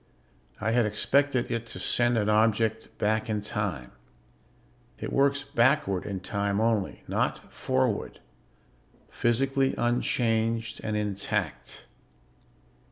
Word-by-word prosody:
I 110 +1 0
had 120 -2 +3
expected 130 +5 +1
it 115 0 -2
to - - -5
send 120 0 +2
an 105 -2 +1
object 110 +1 +2
back 110 +2 0
in 105 -1 0
time 100 - -3 1.1
it - - -5
works 140 +1 +2
backward 130 -7 +1
in 95 -3 -4
time 100 +1 -1
only, 110 -3 0
not - - -2
forward - - -1 0.9
physically 135 +3 +1
unchanged 115 -1 0
and 105 -1 -1
intact. 105 -4 -3
110 Hz, 105 wpm, -27 LUFS, 105-120 Hz, 1.1 s, had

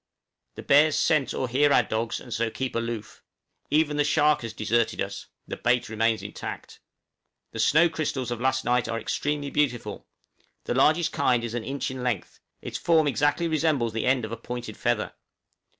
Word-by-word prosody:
The - - -8
bears 150 +2 +5
scent 150 -6 +2
or 130 - -2
hear 140 +4 +3
our 125 - +5
dogs, 110 +1 -2
and 120 - -8
so 115 0 0
keep 130 +3 -4
aloof; 115 -2 -4 0.5
even 150 0 +2
the 145 - +3
shark 150 0 +3
has 115 -1 -5
deserted 115 +1 0
us, 100 0 -4 0.2
the - - -5
bait 125 -1 +1
remains 110 0 0
intact. - - -7 0.7
The - - -7
snow 165 +4 +5
crystals 145 -6 -3
of 120 -1 -4
last 130 0 +1
night 125 0 +2
are 115 - -2
extremely 145 +5 -2
beautiful; 120 -8 -1 0.6
the - - -2
largest 160 +2 +3
kind 125 -6 +2
is 115 -1 -4
an 120 -2 -3
inch 135 +2 -3
in 130 -1 -6
length; 125 -7 -3 0.2
its - - -5
form 160 -2 +3
exactly 145 +4 +1
resembles 155 -8 +1
the 115 - -1
end 130 -3 +2
of 110 - -8
a 115 - -4
pointed 120 +1 -6
feather. - - -1
125 Hz, 180 wpm, -26 LUFS, 115-145 Hz, 0.7 s, bears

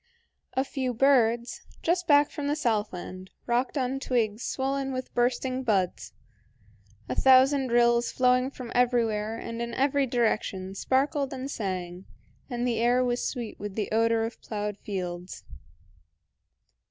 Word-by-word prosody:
A 265 - +1
few 260 -2 -3
birds, 240 -2 +2 0.2
just 350 +1 +1
back 290 -1 +5
from 295 -2 -4
the 290 - +1
southland, 205 - -2 0.2
rocked 245 +4 0
on 265 0 -1
twigs 230 -5 0
swollen 270 +1 -2
with 255 0 -5
bursting 255 +1 0
buds, 195 -7 -1 0.9
a 125 - -2
thousand 265 - +5
rills 240 0 +3
flowing 250 0 +3
from 250 -3 -9
everywhere 225 -3 +1
and 230 0 -6
in 235 0 -4
every 275 0 +2
direction 215 -6 -1
sparkled 275 +6 0
and 265 +1 -5
sang, 185 -4 -4 0.4
and 245 -1 -2
the 230 -2 0
air 245 +2 +3
was 245 0 -1
sweet 240 -5 -6
with 205 -1 -6
the 210 -3 -2
odor 225 0 +2
of 230 - -7
ploughed 210 -1 -4
fields. 180 -2 -5
240 Hz, 140 wpm, -27 LUFS, 215-265 Hz, 0.9 s, back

